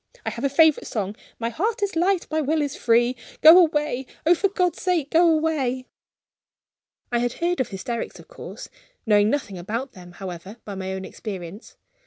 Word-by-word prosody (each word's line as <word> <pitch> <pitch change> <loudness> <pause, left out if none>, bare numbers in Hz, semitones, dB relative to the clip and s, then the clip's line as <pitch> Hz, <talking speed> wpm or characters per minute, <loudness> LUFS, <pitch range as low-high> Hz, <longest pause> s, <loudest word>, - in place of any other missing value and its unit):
I - - -1
have 235 - -7
a 275 - +2
favorite 315 +2 +4
song: 205 -2 -3 0.2
'My 230 0 -2
heart 415 - -1
is 400 - -1
light, 360 +2 +2
my 315 0 +1
will 305 +1 +1
is 285 - -3
free.' 240 +2 +2 0.3
Go 325 +3 +10
away! 300 -6 +1 0.2
oh, 340 - +6
for 375 +3 +1
God's 360 -3 0
sake, 340 -6 0
go 335 +1 +5
away!" 290 -6 0 1.3
I 240 - +2
had 245 0 -1
heard 350 +1 -1
of 260 - +1
hysterics, 225 +4 -5
of - - -15
course; - - -9 0.4
knowing 210 -1 +4
nothing 225 -9 -2
about 230 +9 -4
them, 180 -4 -13
however, 190 +3 -8
by 205 - -6
my 190 -1 -4
own 190 0 -5
experience. 190 0 -8
260 Hz, 185 wpm, -24 LUFS, 210-325 Hz, 1.3 s, Go